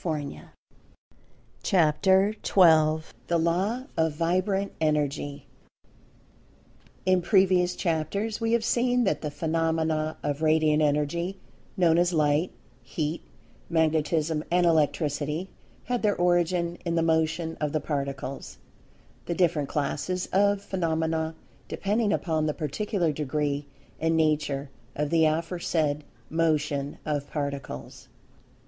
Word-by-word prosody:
[Pg - - -6
171] 150 -3 -5 1.1
CHAPTER 190 +4 +3
XII 160 -4 +4
THE 170 - +2
LAW 185 +9 0
OF 160 -1 +1
VIBRANT 185 +5 0
ENERGY 145 -2 -1 1.6
IN 185 -1 +3
previous 185 -2 +3
chapters 200 +7 -2
we 225 0 +1
have 235 -1 +2
seen 245 +1 +2
that 195 - 0
the 150 - -3
phenomena 160 -1 -1
of 145 +1 -2
Radiant 155 -1 +3
Energy, 150 +5 0 0.4
known 170 -2 +4
as 175 0 +2
Light, 150 +2 +2 0.3
Heat, 150 +6 -3 0.5
Magnetism 160 -1 +1
and 175 0 +3
Electricity, 155 +1 0 0.3
had 245 -1 -2
their 210 -2 +2
origin 175 0 +1
in 170 -1 -1
the 165 - +2
Motion 160 0 0
of 150 -1 0
the 155 - 0
Particles, 140 -2 -4 0.7
the 170 - -1
different 165 -6 +1
classes 155 +5 -2
of 200 +1 +3
phenomena 160 -3 -1 0.3
depending 210 +1 0
upon 160 -6 0
the 150 - -1
particular 170 +3 -1
degree 145 0 -2 0.3
and 160 0 +1
nature 150 -3 0 0.2
of 150 0 -2
the 165 -1 +4
aforesaid 160 -2 0 0.3
Motion 150 -3 0
of 145 -2 -2
Particles. 140 - -5
160 Hz, 115 wpm, -27 LUFS, 150-180 Hz, 1.6 s, XII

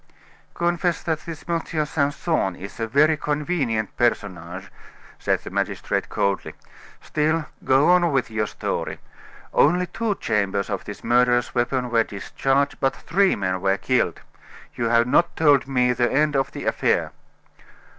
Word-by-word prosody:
"Confess 175 0 0
that 160 -2 -1
this 165 -2 -7
M. 170 -1 0 0.2
Simpson 145 - 0
is 100 +5 -10
a 115 - -1
very 150 +7 +4
convenient 145 - -1
personage," 95 -5 -2 0.5
said - - 0
the - - -8
magistrate - - -2
coldly. 100 -1 -1 0.5
"Still, 155 +1 0 0.2
go 135 +3 +4
on 175 -2 +4
with 135 -4 0
your 110 -1 -1
story. - - -3 0.6
Only 180 +4 +4
two 210 +4 -2
chambers 100 - -1
of - - -3
this - - -8
murderous 120 0 +2
weapon 125 0 0
were 115 -1 +4
discharged, 135 +8 -1
but 135 - +1
three 195 +3 +2
men 95 -2 -2
were 95 0 +2
killed. 125 -9 0 0.5
You 120 - -2
have 115 +1 +3
not 170 +7 +2
told 145 -4 +4
me 125 -2 +2
the 120 0 +1
end 150 +2 +2
of 135 0 0
the - - -7
affair." - - +1
135 Hz, 145 wpm, -23 LUFS, 110-155 Hz, 0.6 s, very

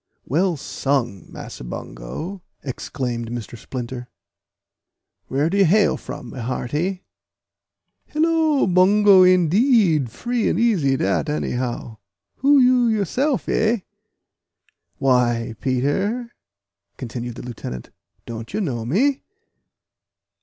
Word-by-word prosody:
"Well 170 +5 +1
sung, 125 - -2
Massa - - -9
Bungo!" - - -7 0.2
exclaimed 125 -3 -4
Mr. 120 -1 -6
Splinter; 125 +1 -6 1.2
"where 140 +3 +1
do 195 +4 0
you 195 - +6
hail 200 +5 +4
from, 120 - -8
my 130 - -8
hearty?" 150 +10 -2 1.0
"Hillo! 315 -2 +2
Bungo, 190 +2 +6
indeed! 185 - +4
free 240 - -1
and - - 0
easy 175 - +2
dat, 160 0 0
anyhow. 125 -5 -3 0.4
Who 285 +2 +4
you 250 -2 +5
yousef, 235 - 0
eh?" 220 0 +1 1.2
"Why, 120 -3 +2
Peter," 195 - 0 0.7
continued 120 -1 -6
the - - -8
lieutenant, 110 - -7 0.3
"don't 115 - -7
you - - 0
know 130 - -2
me?" 260 - +1
155 Hz, 105 wpm, -22 LUFS, -, 1.2 s, you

